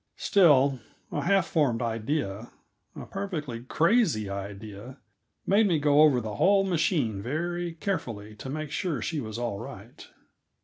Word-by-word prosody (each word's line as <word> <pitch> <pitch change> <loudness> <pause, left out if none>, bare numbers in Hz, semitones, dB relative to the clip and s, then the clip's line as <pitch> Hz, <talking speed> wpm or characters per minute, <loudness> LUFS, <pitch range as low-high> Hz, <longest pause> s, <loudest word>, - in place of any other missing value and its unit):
Still, 140 -8 +4 0.3
a - - -2
half 195 -3 +3
formed 140 -8 +1
idea 115 -1 -2 0.5
a - - -7
perfectly 155 - -5
crazy 160 - +2
idea 100 +5 -7 0.5
made 205 +2 +4
me 170 -4 +2
go 145 0 +4
over 150 -5 +5
the 110 -3 -5
whole 195 +1 +4
machine 160 - 0
very 170 +7 -3
carefully 115 - -4
to 130 - -7
make 155 +1 -4
sure 155 - -2
she 160 - -2
was 110 -3 -5
all 120 -4 -3
right. 115 -2 -10
140 Hz, 140 wpm, -27 LUFS, 110-170 Hz, 0.5 s, over